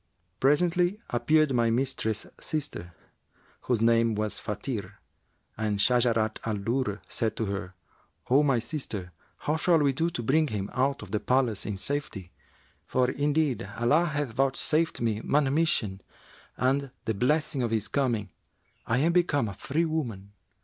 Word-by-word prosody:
Presently 175 Hz, +7 st, +2 dB
appeared 155 Hz, +4 st, +3 dB
my 120 Hz, -2 st, +3 dB
mistress's 115 Hz, -3 st, -1 dB
sister, 145 Hz, -, -4 dB, 0.7 s
whose 120 Hz, -3 st, +1 dB
name 115 Hz, -1 st, +3 dB
was 105 Hz, 0 st, -2 dB
Fбtir, 105 Hz, -2 st, -4 dB, 0.6 s
and 105 Hz, -1 st, -1 dB
Shajarat 115 Hz, -1 st, +2 dB
al 110 Hz, -1 st, -1 dB
Durr 110 Hz, 0 st, -1 dB
said 110 Hz, -2 st, -1 dB
to 110 Hz, -, -1 dB
her, 100 Hz, -2 st, -4 dB, 0.5 s
'O 135 Hz, +4 st, +5 dB
my 140 Hz, -4 st, +3 dB
sister, 115 Hz, -, -4 dB, 0.3 s
how 150 Hz, +2 st, +1 dB
shall 170 Hz, +1 st, +4 dB
we 145 Hz, -3 st, +2 dB
do 165 Hz, +5 st, 0 dB
to 120 Hz, -8 st, -4 dB
bring 155 Hz, +7 st, +3 dB
him 100 Hz, -5 st, -4 dB
out 135 Hz, +2 st, 0 dB
of -, -, -11 dB
the 105 Hz, -, 0 dB
palace 125 Hz, -4 st, +1 dB
in 105 Hz, -2 st, -3 dB
safety; 105 Hz, -7 st, -3 dB, 0.5 s
for 125 Hz, 0 st, +1 dB
indeed 145 Hz, -6 st, 0 dB
Allah 145 Hz, +9 st, +3 dB
hath 145 Hz, -5 st, -2 dB
vouchsafed 135 Hz, +5 st, +1 dB
me 110 Hz, -2 st, 0 dB
manumission 140 Hz, -, +1 dB, 0.6 s
and, 130 Hz, +3 st, +2 dB
by 140 Hz, -, -9 dB, 0.2 s
the 110 Hz, -, 0 dB
blessing 140 Hz, +5 st, +1 dB
of 120 Hz, -, 0 dB
his 110 Hz, -1 st, 0 dB
coming, 115 Hz, -6 st, -1 dB, 0.6 s
I 115 Hz, -, +2 dB
am 155 Hz, +6 st, +3 dB
become 155 Hz, -8 st, +2 dB
a 100 Hz, -, -5 dB
free 145 Hz, -, -1 dB
woman.' 120 Hz, -12 st, -3 dB
125 Hz, 150 wpm, -28 LUFS, 110-145 Hz, 0.7 s, O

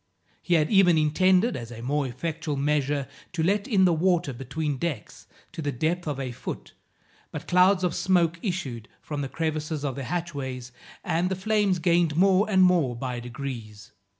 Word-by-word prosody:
He 175 Hz, -, +1 dB
had 155 Hz, -2 st, +2 dB
even 190 Hz, -5 st, +5 dB
intended, 185 Hz, +8 st, +3 dB
as 115 Hz, -2 st, -6 dB
a 115 Hz, 0 st, -8 dB
more 140 Hz, +2 st, 0 dB
effectual 155 Hz, +4 st, -4 dB
measure, 145 Hz, -1 st, 0 dB, 0.3 s
to 165 Hz, -2 st, -1 dB
let 200 Hz, +4 st, +1 dB
in 200 Hz, -7 st, +4 dB
the 175 Hz, -, +4 dB
water 175 Hz, -3 st, +1 dB
between 135 Hz, +3 st, -3 dB
decks 145 Hz, -10 st, -5 dB, 0.2 s
to -, -, -6 dB
the 145 Hz, -1 st, -1 dB
depth 160 Hz, +6 st, -1 dB
of 145 Hz, -3 st, -2 dB
a 130 Hz, -2 st, -3 dB
foot, 125 Hz, -, -7 dB, 0.6 s
but -, -, -7 dB
clouds 185 Hz, +1 st, +4 dB
of 175 Hz, -2 st, +1 dB
smoke 175 Hz, -2 st, +1 dB
issued 140 Hz, -, -4 dB
from 145 Hz, -2 st, -5 dB
the 135 Hz, -, -4 dB
crevices 155 Hz, -1 st, -3 dB
of 135 Hz, -, -1 dB
the 140 Hz, -, -5 dB
hatchways, 135 Hz, -7 st, -4 dB, 0.3 s
and 175 Hz, +3 st, 0 dB
the 190 Hz, -, -1 dB
flames 205 Hz, -1 st, +1 dB
gained 170 Hz, -2 st, +2 dB
more 195 Hz, +4 st, +4 dB
and 190 Hz, -2 st, +5 dB
more 170 Hz, -9 st, +3 dB
by 125 Hz, 0 st, -4 dB
degrees. 120 Hz, -4 st, -7 dB
160 Hz, 180 wpm, -26 LUFS, 135-180 Hz, 0.6 s, even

